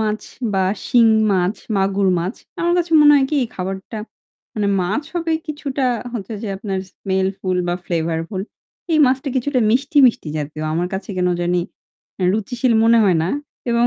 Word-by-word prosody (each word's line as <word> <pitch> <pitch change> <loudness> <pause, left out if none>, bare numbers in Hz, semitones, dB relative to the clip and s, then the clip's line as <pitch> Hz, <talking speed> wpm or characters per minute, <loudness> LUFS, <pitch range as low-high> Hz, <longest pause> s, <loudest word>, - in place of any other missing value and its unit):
মাছ 215 -1 -1 0.3
বা 190 -1 +2 0.2
শিং 235 -2 +5 0.3
মাছ, 185 +1 +1 0.2
মাগুর 195 0 +1
মাছ। 180 +7 -2 0.3
আমার 345 0 +2
কাছে 335 -1 -1
মনে 295 0 +8
হয় 275 - +3
কি 305 - +1 0.2
খাবারটা 190 +4 -5 0.6
মানে 210 -2 0
মাছ 195 +10 -1
হবে 335 -1 -1
কিছুটা 285 -3 -3 0.3
হচ্ছে 225 -3 -5
যে 215 - -3
আপনার 195 -2 -3
smellfull 190 -1 -1
বা 175 - +1
flavorful. 165 +3 -2 0.5
এই 310 - +4
মাছটা 265 +2 0
কিছুটা 260 +1 +1
মিষ্টি, 275 +5 0
মিষ্টি 225 -9 0
জাতীয়। 150 +1 -5
আমার 175 +2 0
কাছে 190 - -5
কেনো 180 -1 +1
জানি 175 +1 +1 0.6
অ্যা 185 - -2
রুচিশীল 240 +4 0
মনে 230 0 +5
হয় 185 -4 +3
না। 165 - -1 0.4
এবং 235 0 +3
200 Hz, 165 wpm, -20 LUFS, 185-255 Hz, 0.6 s, মনে